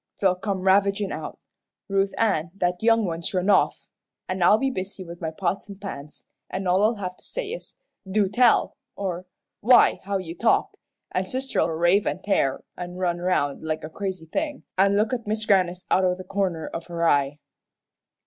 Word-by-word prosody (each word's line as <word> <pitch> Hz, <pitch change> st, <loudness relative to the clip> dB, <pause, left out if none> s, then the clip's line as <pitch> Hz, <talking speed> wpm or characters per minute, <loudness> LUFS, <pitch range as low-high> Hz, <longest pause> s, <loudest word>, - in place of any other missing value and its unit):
They'll 190 Hz, -2 st, +4 dB
come 190 Hz, +1 st, -3 dB
ravagin' 200 Hz, +1 st, +3 dB
out -, -, -6 dB, 0.5 s
'Ruth 195 Hz, 0 st, +1 dB
Ann, 185 Hz, -8 st, +1 dB
that 180 Hz, -2 st, -1 dB
young 225 Hz, -1 st, +4 dB
one's 170 Hz, +1 st, -3 dB
run 185 Hz, +3 st, +2 dB
off!' -, -, +2 dB, 0.4 s
An' 185 Hz, 0 st, -3 dB
I'll 190 Hz, +5 st, +6 dB
be 270 Hz, +3 st, 0 dB
busy 190 Hz, -3 st, -5 dB
with 170 Hz, 0 st, -10 dB
my 160 Hz, -, -1 dB
pots 185 Hz, +4 st, -3 dB
an' 200 Hz, -, -8 dB
pans, 150 Hz, -7 st, -9 dB, 0.2 s
an' 190 Hz, +1 st, -4 dB
all 185 Hz, +2 st, +3 dB
I'll 220 Hz, +3 st, +3 dB
have 185 Hz, -3 st, -5 dB
to -, -, -21 dB
say 470 Hz, -3 st, -5 dB
is: -, -, -9 dB, 0.3 s
'Do 200 Hz, 0 st, +2 dB
tell!' 235 Hz, +5 st, +3 dB, 0.2 s
or, 185 Hz, -2 st, -4 dB, 0.3 s
'Why, 245 Hz, +3 st, +5 dB
how 200 Hz, +1 st, -2 dB
you 175 Hz, -3 st, -6 dB
talk!' 230 Hz, -, +2 dB, 0.4 s
An' 185 Hz, -, 0 dB
sister'll 255 Hz, -7 st, -1 dB
rave 175 Hz, +5 st, +2 dB
an' -, -, -2 dB
tear, 140 Hz, -9 st, +1 dB
an' 180 Hz, 0 st, -7 dB
run 175 Hz, -1 st, -1 dB
round 175 Hz, -6 st, 0 dB
like 155 Hz, 0 st, -2 dB
a 155 Hz, -, -5 dB
crazy 190 Hz, -2 st, -4 dB
thing, 295 Hz, -, -3 dB
an' 195 Hz, +1 st, +3 dB
look 215 Hz, +3 st, +1 dB
at 235 Hz, -4 st, -3 dB
Mis' 215 Hz, +1 st, -1 dB
Grannis 180 Hz, -3 st, +2 dB
out 190 Hz, -, +4 dB
o' 180 Hz, -1 st, +2 dB
the 185 Hz, -, -9 dB
corner 185 Hz, -5 st, -2 dB
of 165 Hz, -, -6 dB
her 170 Hz, -1 st, 0 dB
eye." 145 Hz, -1 st, +2 dB
190 Hz, 190 wpm, -25 LUFS, 175-205 Hz, 0.5 s, I'll